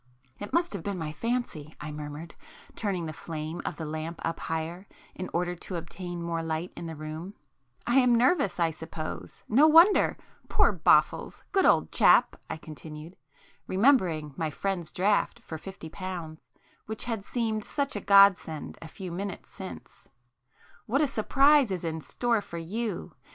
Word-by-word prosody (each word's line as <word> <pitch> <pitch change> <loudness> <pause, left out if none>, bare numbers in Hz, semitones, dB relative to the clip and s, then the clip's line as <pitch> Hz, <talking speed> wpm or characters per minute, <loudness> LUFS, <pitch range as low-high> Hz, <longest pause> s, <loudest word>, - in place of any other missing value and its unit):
"It 205 - -6
must 340 -4 +1
have 200 - -3
been 200 +2 -3
my 160 -3 -4
fancy;" 170 -6 -3
I 150 +1 -6
murmured, 150 +2 -7 0.4
turning 190 -6 -2
the 155 - -5
flame 160 +1 -5
of - - -3
the 160 - -4
lamp 155 +2 -5
up 165 - -2
higher 165 +4 -4 0.3
in 185 - -6
order 175 +1 0
to 180 +1 -7
obtain 175 +1 -5
more 170 -1 -2
light 165 +2 -3
in 170 - -6
the 160 - -6
room—"I 155 - -5
am 250 -2 +5
nervous 245 - +2
I 165 -1 +3
suppose,—no 160 - 0
wonder! 335 +6 +6 0.3
Poor - - +4
Boffles!—good 390 -2 +2
old - - +3
chap!" - - +5
I - - -3
continued, 155 +1 -10 0.5
remembering 185 - +3
my 160 +1 -1
friend's 175 +1 -3
draft 205 +5 +1
for 160 -8 -8
fifty 190 -2 -9
pounds, 175 -5 -7 0.4
which 220 0 -4
had 225 -4 -3
seemed 220 -1 -1
such 280 +4 -2
a - - -3
godsend 195 -6 +4
a 165 - -8
few 185 +2 -8
minutes 190 +2 -5
since—"What 125 - -7
a 300 - +3
surprise 275 +3 +4
is 185 -3 -3
in 160 -1 -3
store 235 +5 0
for 170 - -8
[p 165 - -5
14] 165 - -12
you! 215 -7 -3
175 Hz, 160 wpm, -28 LUFS, 160-215 Hz, 0.5 s, wonder